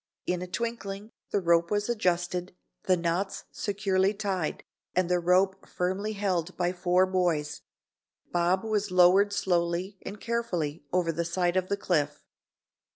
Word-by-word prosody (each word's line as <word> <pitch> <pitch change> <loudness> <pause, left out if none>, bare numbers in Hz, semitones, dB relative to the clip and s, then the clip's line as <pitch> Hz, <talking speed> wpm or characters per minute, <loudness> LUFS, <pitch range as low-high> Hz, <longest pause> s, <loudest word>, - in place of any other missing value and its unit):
In 180 0 -1
a 180 - -4
twinkling, 215 0 -4 0.2
the 205 - +1
rope 170 -2 +3
was 205 0 0
adjusted, 180 -5 -1 0.3
the 185 -1 +4
knots 175 +3 -1
securely 195 -1 0
tied, 195 -6 -2 0.3
and 185 -1 +2
the 180 0 +3
rope 185 +2 +2
firmly 190 +4 -1
held 185 -4 -1
by 180 0 +1
four 180 +1 +3
boys, 175 -5 0 0.7
Bob 175 +3 +2
was 210 -2 0
lowered 185 +3 +5
slowly 180 0 0
and 205 +2 -7
carefully 180 -11 -2
over 175 -2 +2
the 170 +1 -1
side 175 +1 0
of 185 -1 +1
the 200 - 0
cliff. 150 -7 0
185 Hz, 145 wpm, -28 LUFS, 175-200 Hz, 0.7 s, lowered